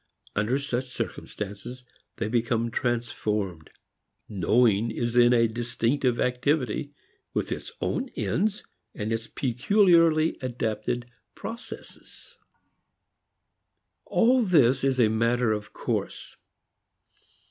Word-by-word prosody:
Under 105 +6 +1
such 135 -3 -2
circumstances, 120 -1 -6 0.3
they 115 - -2
become 115 0 0
transformed. 105 -8 -2 0.6
Knowing 110 +3 +2
is 120 +1 -2
then 120 0 +6
a 115 -1 +4
distinctive 120 +2 0
activity, 130 +1 0 0.4
with - - -1
its - - -5
own 260 0 -1
ends 205 +3 -1 0.3
and 105 +2 -2
its 115 0 -3
peculiarly 165 - +3
adapted 120 -1 -2 0.3
processes. 230 +1 -10 1.7
All 250 +2 +3
this 140 - +4
is 135 -1 +1
a 115 - +6
matter 115 +2 +1
of 105 -1 -5
course. - - -4
120 Hz, 95 wpm, -26 LUFS, 115-135 Hz, 1.7 s, then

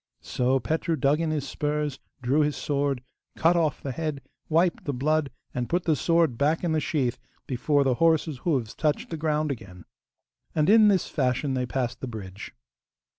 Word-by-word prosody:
So 130 +1 +1
Petru 160 +7 -1
dug 140 +1 +2
in 165 - 0
his 150 -3 -2
spurs, 150 -1 -2 0.2
drew 135 +5 +2
his 150 -1 +1
sword, 140 -3 -1 0.3
cut 165 +2 +3
of 160 -4 0
the 135 - -3
head, 150 -1 -3 0.3
wiped 165 +2 +2
the 145 - -2
blood, 150 +2 +1 0.2
and 125 -1 -3
put 175 +1 +1
the 160 - +2
sword 165 -7 +2
back 155 +5 +2
in 170 - +1
the 160 - +2
sheath 130 -5 -1 0.3
before 140 +3 +1
the 135 -2 +2
horse's 160 -4 +3
hoofs 130 -8 -1
touched 155 +1 -1
the - - -2
ground 155 -1 0
again. 90 -8 -8 0.7
And 155 +4 +3
in 220 -1 +7
this 195 -4 +3
fashion 130 0 0
they 125 -1 -1
passed 125 -1 -2
the 130 - -3
bridge. 100 -4 -8
145 Hz, 180 wpm, -26 LUFS, 130-160 Hz, 0.7 s, in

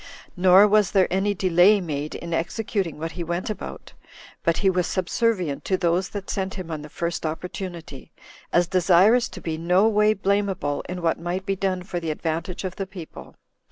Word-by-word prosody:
Nor 185 +2 +6
was 210 -2 +3
there 190 -2 +5
any 195 +2 +1
delay 185 +2 +4
made 150 -4 -4
in 170 0 -6
executing 180 0 -2
what 165 +2 -4
he 175 - -5
went 175 +5 -3
about, - - -8 0.5
but 165 -1 +1
he 200 - +1
was 180 -2 +2
subservient 185 -4 -1
to 190 - +1
those 175 +1 0
that 200 -2 -6
sent 190 -1 -3
him 180 -4 -6
on 155 -2 -4
the 150 - -10
first 170 +2 -3
opportunity, 165 -2 -6 0.4
as 175 0 +3
desirous 190 +6 +4
to - - -9
be 160 -1 -4
no 180 +5 +3
way 210 0 +3
blameable 195 -7 0
in 180 -1 -5
what 165 - +1
might 175 +3 -3
be 195 - 0
done 185 -1 -1
for 180 -1 -4
the 165 -1 -4
advantage 165 +3 -3
of 185 -1 -5
the 195 - -3
people. 180 -4 -10
180 Hz, 190 wpm, -24 LUFS, 170-195 Hz, 0.5 s, Nor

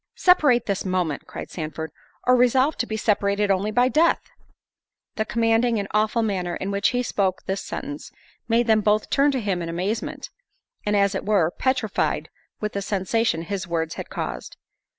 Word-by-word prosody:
"Separate 290 -10 +4
this 200 -1 -1
moment," 180 -6 -1
cried - - -8
Sandford, 160 -1 -5 0.3
"or 250 - +5
resolve 255 +4 +3
to 240 - -1
be 220 - -3
separated 205 -1 +1
only 195 +2 +1
by—death." 255 +9 +2 0.8
The 220 - -1
commanding 230 +1 +2
and 200 -1 -2
awful 215 +2 +2
manner 185 -5 -1
in 195 - -3
which 200 +1 +2
he 250 0 0
spoke 190 -5 -1
this 195 +1 -2
sentence, 290 +2 -6 0.4
made 235 +1 +3
them 220 -2 +4
both 210 +1 +1
turn 280 +1 +4
to 270 -2 0
him 195 -5 -1
in 165 - -4
amazement, 185 +7 -3 0.6
and 210 - +2
as 200 0 +3
it 190 - -3
were, 195 -6 +2
petrified 255 -4 -1 0.3
with 210 0 -3
the 200 - -2
sensation 195 -2 0
his 190 +1 -4
words 165 -2 -1
had - - -7
caused. - - -5
210 Hz, 170 wpm, -24 LUFS, 190-240 Hz, 0.8 s, or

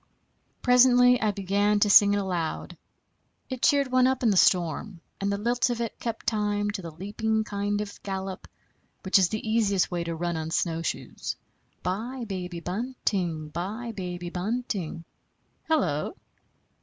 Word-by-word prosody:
Presently 250 0 +6
I 215 - +2
began 205 +1 +1
to 205 - +4
sing 205 0 +7
it - - +1
aloud. 180 -5 -3 0.8
It 255 -2 -4
cheered 280 -2 +3
one 255 0 +5
up 260 -1 0
in 225 - +4
the - - +2
storm, 180 +1 +2 0.2
and 200 0 0
the 200 - 0
lilt 240 +4 +1
of 240 -1 -2
it 230 -2 -4
kept 230 -2 -4
time 205 -2 0
to 205 -2 -5
the 170 - -6
leaping 215 +6 -1
kind 205 0 -2
of 205 -1 -7
gallop 190 -1 -5 0.6
which 190 +1 +4
is 185 -2 +3
the 215 +2 -4
easiest 205 -5 +2
way 175 -1 -1
to 170 0 -3
run 170 0 -2
on 160 0 -3
snowshoes: 165 0 -2 0.5
"Bye, 230 +7 -3
baby 180 -3 -5
bunting; 180 -6 -2
bye, 210 +9 -4
baby 175 -2 -5
bunting 190 -4 -3 0.6
Hello!" 180 - 0
200 Hz, 155 wpm, -27 LUFS, 180-230 Hz, 0.8 s, sing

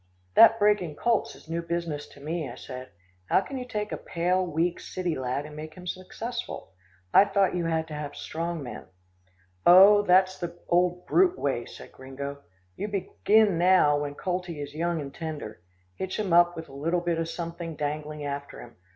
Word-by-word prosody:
"That 225 0 +8
breaking 205 -7 +2
colts 230 +6 0
is - - -17
new 165 +1 -2
business 170 -3 -3
to - - -16
me," 155 0 -3
I 120 - -8
said. 130 0 -8 0.4
"How - - +3
can 265 +7 -6
you 250 - -6
take 210 -3 -3
a - - -2
pale, 180 +2 0
weak, 170 0 -1
city 180 -2 -3
lad 130 +2 -2
and 150 0 -10
make 155 +1 -8
him 180 - -11
successful? 220 - -6 0.4
I 200 - +8
thought 200 -2 +2
you 175 -2 -1
had 160 -1 0
to - - -7
have 150 -1 -5
strong 165 -1 -4
men." 125 - -8 0.8
"Oh, 195 +4 +8
that's 185 -1 +3
the 175 -1 -5
old 180 0 +1
brute 365 0 +3
way," 125 -4 -1
said - - -12
Gringo. 140 +2 -7 0.4
"You 205 - -3
begin 205 -1 +2
now 175 -5 +5
when 145 -1 -4
coltie 180 -3 -3
is 145 0 -6
young 170 +1 -1
and 140 -2 -6
tender. 150 - -6 0.3
Hitch 190 - -4
him 200 -5 -1
up 175 0 +5
with 160 0 -7
a 135 - -14
little 165 +5 -1
bit 170 -1 -1
of 165 0 -2
something 170 -1 -5
dangling 150 0 -4
after 140 0 -5
him. 120 - -12
170 Hz, 190 wpm, -27 LUFS, 150-185 Hz, 0.8 s, That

